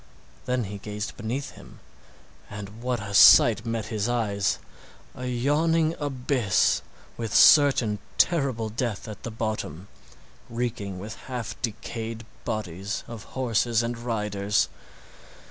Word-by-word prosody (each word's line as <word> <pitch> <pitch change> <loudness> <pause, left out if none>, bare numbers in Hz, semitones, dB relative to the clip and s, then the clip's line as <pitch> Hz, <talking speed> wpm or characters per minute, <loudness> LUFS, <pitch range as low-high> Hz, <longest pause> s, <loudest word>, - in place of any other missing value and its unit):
Then 125 -1 +1
he 100 0 -6
gazed 105 +1 -5
beneath 125 +5 -4
him, - - -15 0.7
and 105 +2 -8
what 125 -1 -1
a 100 -1 -6
sight 110 +3 +7
met 115 -1 -2
his 105 +2 -1
eyes! 100 -5 0 0.6
A 125 - -6
yawning 155 +6 +2
abyss, 125 - +1 0.4
with 115 -3 -3
certain 140 -7 +7
and 105 - -2 0.2
terrible 135 -10 +2
death 115 -1 -3
at 105 - -8
the - - -5
bottom, 110 -6 -4 0.6
reeking 115 -5 -3
with 105 +4 -7
half 125 -4 -4
decayed 115 0 -5 0.2
bodies 100 -3 -3
of 115 -4 -8
horses 120 -2 +1
and 120 +1 -2
riders! 105 -3 0
115 Hz, 125 wpm, -26 LUFS, 105-125 Hz, 0.7 s, sight